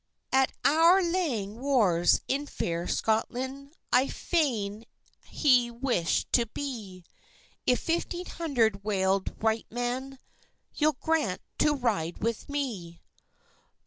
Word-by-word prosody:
"At 265 0 +3
our 330 +6 +6
lang 265 - -1
wars, 215 -11 +3
in 285 +2 -1
fair 170 -8 -3
Scotland, 260 +6 -2 0.2
I 255 +2 +5
fain 230 - -1 0.4
ha'e 250 -5 +3
wish'd 235 - -1
to 235 -2 +3
be, 215 -8 -6 0.6
If 250 - +3
fifteen 345 +2 -2
hundred 235 - 0
waled 195 -1 0
wight 220 0 +1
men 250 +3 -3 0.6
You'll 305 0 +2
grant 310 -13 0 0.2
to 300 -1 +3
ride 205 - -1
with 230 +5 -3
me." 220 -13 -4
245 Hz, 110 wpm, -28 LUFS, 205-285 Hz, 0.6 s, our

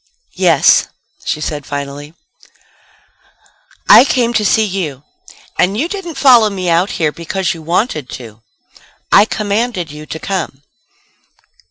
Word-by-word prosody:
"Yes," - - +4 0.4
she 155 - -2
said 150 -1 -4
finally. 145 +2 -7 1.7
"I - - +9
came 245 -3 0
to 220 -2 +1
see 220 +2 +3
you. 170 -9 -4 0.6
And 195 +3 +2
you 295 +8 0
didn't 350 -4 -6
follow 245 -5 +5
me 185 -3 -2
out 175 +4 +2
here 155 -2 +1
because 170 +3 -3
you 165 - -10
wanted 160 - -2
to. 115 -3 -13 0.7
I 205 - +7
commanded 210 -5 -2
you 150 +1 -10
to - - -6
come." 160 -6 -4
180 Hz, 130 wpm, -15 LUFS, 150-220 Hz, 1.7 s, I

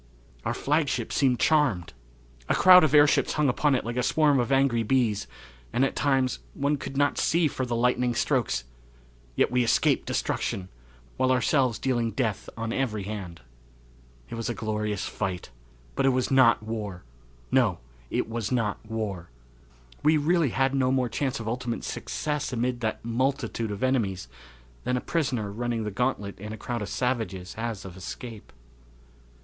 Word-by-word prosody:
Our - - -1
flagship 145 -5 0
seemed 130 -3 +2
charmed. 135 - +2 0.6
A - - +3
crowd 180 -1 +8
of 155 -1 +3
airships 145 0 +5
hung 150 -1 +2
upon 140 +3 +2
it 125 - -2
like 120 +1 -4
a - - +2
swarm 145 +1 +3
of 120 +2 -1
angry 135 -3 +3
bees, 115 -3 +1 0.4
and, 130 - +2
at - - -2
times, 135 -3 +1 0.2
one 145 +1 +1
could 135 0 -6
not 145 0 +2
see 170 -1 +3
for 130 -2 -3
the 120 - -1
lightning 125 0 +1
strokes 65 - 0 0.7
yet - - +2
we 125 0 +3
escaped 115 - +2
destruction, 95 -1 -2 0.5
while 130 0 +2
ourselves 130 -1 +2
dealing 120 -3 0
death 110 -2 -2
on 115 0 -3
every 110 -7 -1
hand. 95 - -6 0.9
It - - -9
was 115 0 -3
a 120 - -2
glorious 105 -2 -2
fight, 95 - -4 0.4
but 135 - +1
it - - +6
was 130 0 0
not 130 -5 +5
war; 105 -5 -5 0.5
no, - - +3 0.3
it - - -1
was 115 -1 -3
not 115 -5 -1
war. 105 -6 -4 0.7
We 155 +2 +4
really 160 0 +2
had 135 +3 +1
no 130 -1 +2
more 130 -2 +1
chance 135 +1 -2
of 115 - -6
ultimate 120 0 -3
success 150 -2 -3
amid 125 0 -1
that 110 -1 -3
multitude 120 -1 -1
of 100 +2 -4
enemies 110 - 0 0.6
than 125 - 0
a - - 0
prisoner 125 -10 -1
running 120 +1 -2
the 105 - -3
gauntlet 105 -3 -2
in 105 +2 -6
a - - -7
crowd 120 +2 -4
of 105 - -4
savages 110 -8 -2
has 110 -3 -4
of 90 -2 -9
escape. 110 +4 -8
120 Hz, 165 wpm, -27 LUFS, 110-135 Hz, 0.9 s, crowd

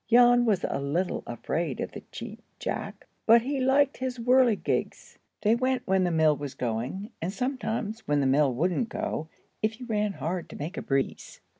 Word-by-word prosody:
Jan 245 0 +6
was 205 -5 +2
a 135 - -2
little 165 +7 -1
afraid - - -2
of - - -3
the - - -8
Cheap - - -8 0.2
Jack, - - -4 0.2
but 230 +1 +7
he 275 +2 -1
liked 275 +2 +3
his 255 -1 -3
whirligigs. 245 -2 +1 0.2
They 215 +1 +5
went 255 +2 +1
when 190 -1 +2
the - - +2
mill 160 -2 +4
was 145 -2 -6
going, 125 - -3
and 170 +3 -1
sometimes 225 -3 -3
when 145 0 +2
the 140 - +2
mill 135 +1 +4
wouldn't 180 - 0
go, 155 - -3 0.3
if 220 +2 -1
you 250 - -7
ran 210 -3 0
hard 170 +3 -3
to - - -9
make 160 +7 -5
a - - -3
breeze. 135 -1 -2
210 Hz, 185 wpm, -28 LUFS, 155-245 Hz, 0.3 s, but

